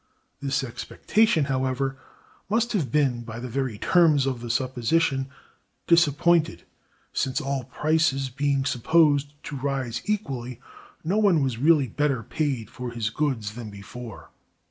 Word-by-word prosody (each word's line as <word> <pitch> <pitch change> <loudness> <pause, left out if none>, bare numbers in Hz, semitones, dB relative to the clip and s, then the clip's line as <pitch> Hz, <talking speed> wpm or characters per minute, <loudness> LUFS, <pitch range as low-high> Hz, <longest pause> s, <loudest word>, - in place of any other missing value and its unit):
This 140 +1 0
expectation, 160 - +1
however, 130 0 -1 0.5
must 235 +3 +1
have 155 - -1
been, 135 -5 +2
by 115 -1 -8
the 125 - -5
very 125 -3 -2
terms 155 - +4
of 130 -3 -2
the 120 - -6
supposition, 130 +3 +1 0.6
disappointed, 170 0 +3 0.5
since, 130 -1 0
all 135 -2 -2
prices 145 -1 +1
being 140 0 0
supposed 145 +2 +2
to 150 - -6
rise 135 -3 -2
equally, 130 - -3 0.4
no 185 +7 +1
one 185 -9 +4
was 125 -4 -2
really 150 -1 +4
better 140 0 0
paid 130 -1 -2
for 125 -1 -6
his 115 -2 -3
goods 115 -7 -1
than 115 -1 -7
before. 110 +3 -10
135 Hz, 135 wpm, -25 LUFS, 125-155 Hz, 0.6 s, terms